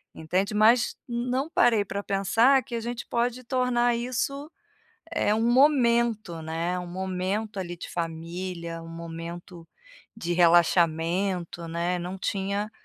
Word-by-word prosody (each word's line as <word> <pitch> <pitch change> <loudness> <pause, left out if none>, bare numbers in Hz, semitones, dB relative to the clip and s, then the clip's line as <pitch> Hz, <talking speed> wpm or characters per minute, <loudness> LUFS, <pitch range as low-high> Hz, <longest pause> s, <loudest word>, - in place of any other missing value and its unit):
entende. 185 +6 -1
Mas, 225 +3 +4
não 250 +5 -2
parei 225 -9 +3
pra 200 +1 -4
pensar 225 +8 +3
que 235 - -6
a - - -1
gente 240 +1 -5
pode 245 +1 -1
tornar 245 -1 +1
isso, 255 +5 -2 0.6
eh, 210 -10 +1
um 220 - 0
momento, 235 - +3
né. 165 +3 -2
Um 180 - -4
momento 190 +3 -3
ali 175 -1 -4
de 170 - -8
família, 170 +1 -5
um - - -10
momento 170 +1 -8 0.5
de 175 -5 -3
relaxamento, 170 +1 +2
né, 170 +2 -1
não 180 +2 -5
tinha, 200 +3 -2
195 Hz, 130 wpm, -26 LUFS, 170-235 Hz, 0.6 s, Mas